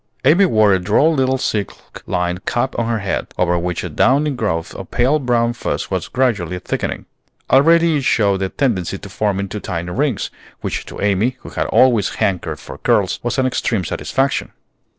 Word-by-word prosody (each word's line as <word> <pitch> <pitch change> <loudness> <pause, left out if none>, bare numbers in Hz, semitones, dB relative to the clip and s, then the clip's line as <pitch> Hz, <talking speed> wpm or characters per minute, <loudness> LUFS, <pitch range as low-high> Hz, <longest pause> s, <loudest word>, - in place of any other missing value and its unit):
Amy 170 +8 +6
wore 110 - +4
a 95 - +2
droll 105 - +3
little 130 -2 +1
silk 105 -5 -4
lined 90 +1 -1
cap 125 +2 0
on 115 - 0
her 115 - +1
head, 100 -3 -2
over 90 -1 +2
which 90 0 -3
a - - -4
downy 145 +4 +2
growth 80 -11 -2
of - - -8
pale 135 +6 +2
brown 120 -3 +1
fuzz 120 - -3
was - - -2
gradually 105 -10 0
thickening. - - -3 0.5
Already 165 +3 +5
it 140 - -2
showed 100 -6 +2
a 95 - 0
tendency 100 -9 -1
to 100 - -10
form 100 0 -1
into 100 +1 -4
tiny 90 -2 -4
rings, - - -1 0.3
which - - -4
to - - -9
Amy, 105 +6 +1
who - - -10
had - - -2
always 120 -6 +3
hankered 85 -5 -1
for - - -10
curls, - - +1
was 120 +2 -2
an 130 - +2
extreme 120 -5 0
satisfaction. 135 +10 -1
110 Hz, 185 wpm, -19 LUFS, 95-130 Hz, 0.5 s, Amy